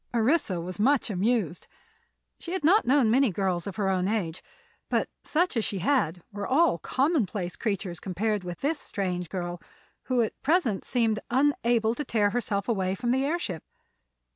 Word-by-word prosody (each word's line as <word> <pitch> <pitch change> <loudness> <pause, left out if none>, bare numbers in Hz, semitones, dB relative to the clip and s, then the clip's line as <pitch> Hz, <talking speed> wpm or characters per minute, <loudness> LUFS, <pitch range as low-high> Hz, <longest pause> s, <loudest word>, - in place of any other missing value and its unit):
Orissa 230 - +2
was 180 +2 -6
much 255 +1 +3
amused. 200 -3 0 0.7
She 345 - -6
had 375 - -2
not 385 +8 +4
known 255 -4 +4
many 265 +1 +4
girls 185 -1 -1
of 200 - -5
her 205 -3 0
own 185 -1 +1
age, 190 -6 -2 0.5
but - - 0
such 345 0 +1
as 225 - +1
she 200 - -2
had 190 - +1
met 175 - -21
were 205 -1 -4
all 290 - +3
commonplace 220 - 0
creatures 195 -5 -3
compared 205 +2 -1
with 175 -1 -7
this 295 +2 0
strange 180 -4 -3
girl, 175 -2 -4 0.4
who 250 -2 +2
at 220 - -5
present 270 - +1
seemed 225 -3 +1
unable 240 -4 +2
to 295 - -4
tear 210 -6 +1
herself 205 -4 -1
away 190 -5 0
from 240 +3 -1
the 265 +1 +2
airship. 275 - -2
220 Hz, 170 wpm, -27 LUFS, 185-265 Hz, 0.7 s, not